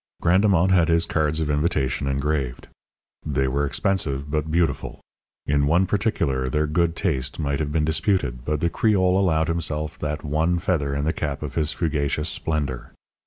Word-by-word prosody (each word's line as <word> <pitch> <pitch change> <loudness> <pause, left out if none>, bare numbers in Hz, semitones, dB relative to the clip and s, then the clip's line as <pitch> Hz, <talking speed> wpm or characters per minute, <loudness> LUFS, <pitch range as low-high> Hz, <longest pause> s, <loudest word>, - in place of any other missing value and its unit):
Grandemont 95 0 +3
had 90 -3 +4
his 85 0 +3
cards 80 -1 0
of 80 - -1
invitation 75 -3 0
engraved. 70 -2 -2 0.6
They 65 -2 0
were 70 +2 0
expensive, 70 -5 -1
but 75 0 -1
beautiful. 80 -5 -1 0.5
In 70 0 +2
one 85 +5 +3
particular 70 - 0
their 75 +4 +1
good 85 +2 0
taste 80 -7 -1
might 70 -2 -1
have 75 -2 -2
been 75 0 +1
disputed; 80 - 0
but 75 +1 -2
the 85 - +2
Creole 95 -2 +2
allowed 80 -5 +2
himself 80 -2 -2
that 75 0 -3
one 80 +4 +1
feather 75 -7 -1
in 70 +1 -1
the 80 - +1
cap 75 -2 -3
of 75 - -5
his 80 -1 +1
fugacious 75 -1 -1
splendour. 70 -6 -3
75 Hz, 165 wpm, -23 LUFS, 70-85 Hz, 0.6 s, had